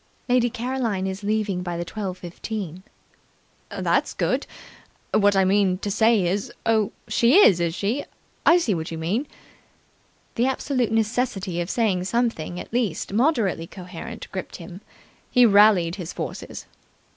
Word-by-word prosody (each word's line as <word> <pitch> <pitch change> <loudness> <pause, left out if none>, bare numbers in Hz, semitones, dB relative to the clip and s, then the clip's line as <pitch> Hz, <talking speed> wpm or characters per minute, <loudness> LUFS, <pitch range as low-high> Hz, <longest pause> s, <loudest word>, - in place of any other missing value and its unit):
"Lady 245 -1 +3
Caroline 235 -5 -2
is 190 +1 -4
leaving 210 -3 -1
by 175 -1 -4
the 175 - -3
twelve 190 -1 -5
fifteen." 180 0 -6 0.9
"That's - - 0
good! - - 0 0.7
What 205 -1 +4
I 190 -1 +4
mean 190 -1 +2
to 205 +1 -4
say 220 -1 +3
is 195 +3 -1
oh, 220 -3 +2 0.2
she 235 +3 +3
is, 210 - +7
is 170 -1 -1
she? 220 +9 -1 0.4
I 340 - +6
see 290 - +1
what 160 -2 -3
you 165 - -5
mean." 200 - -1 1.1
The 240 +3 +1
absolute 260 -3 -1
necessity 215 -5 -1
of 170 - -4
saying 200 -6 +1
something 190 -6 -1
at - - -10
least 215 -7 -1
moderately 225 - +1
coherent 180 -2 -9
gripped 185 - -6
him. 175 +2 -10 0.5
He 250 -1 +5
rallied 200 -5 +5
his 175 -3 -6
forces. - - -6
200 Hz, 145 wpm, -24 LUFS, 180-230 Hz, 1.1 s, is